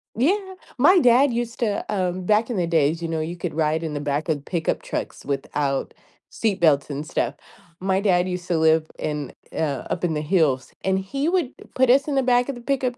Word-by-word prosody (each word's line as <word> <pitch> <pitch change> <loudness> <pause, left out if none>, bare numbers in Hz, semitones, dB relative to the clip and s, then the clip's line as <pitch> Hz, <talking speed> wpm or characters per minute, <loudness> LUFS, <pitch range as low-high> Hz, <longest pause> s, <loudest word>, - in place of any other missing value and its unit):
Yeah, 290 - +3 0.4
my 350 +8 +6
dad 250 +1 +5
used 235 0 -3
to, 210 -4 -1
um, 185 -2 -1
back 215 +4 +2
in 235 - -2
the 175 -2 0
days, 165 0 +2
you 165 - -2
know, 165 -1 -2
you 165 +3 -4
could 175 -1 -4
ride 160 +1 0
in 160 -2 -3
the 145 - -2
back 145 +2 -2
of 150 -4 -1
pickup 165 0 -1
trucks - - -5
without 140 0 -2 0.4
seatbelts 170 -11 +2
and 145 +1 -4
stuff. - - -1 0.4
My 190 +1 +1
dad 180 -3 +2
used 180 -1 -4
to 175 - +1
live 160 0 +3
in, 150 -2 -3 0.2
uh, 145 -5 -2
up 180 - -3
in 165 -3 +1
the 150 - -1
hills, 150 -6 +1
and 190 0 +1
he 275 +11 -2
would 345 -8 0 0.2
put 260 -1 +3
us 275 +3 +5
in 290 - -1
the 270 - +2
back 245 +1 +3
of 275 - -2
the 240 - -10
pickup 255 -1 -1
180 Hz, 215 wpm, -23 LUFS, 155-240 Hz, 0.4 s, my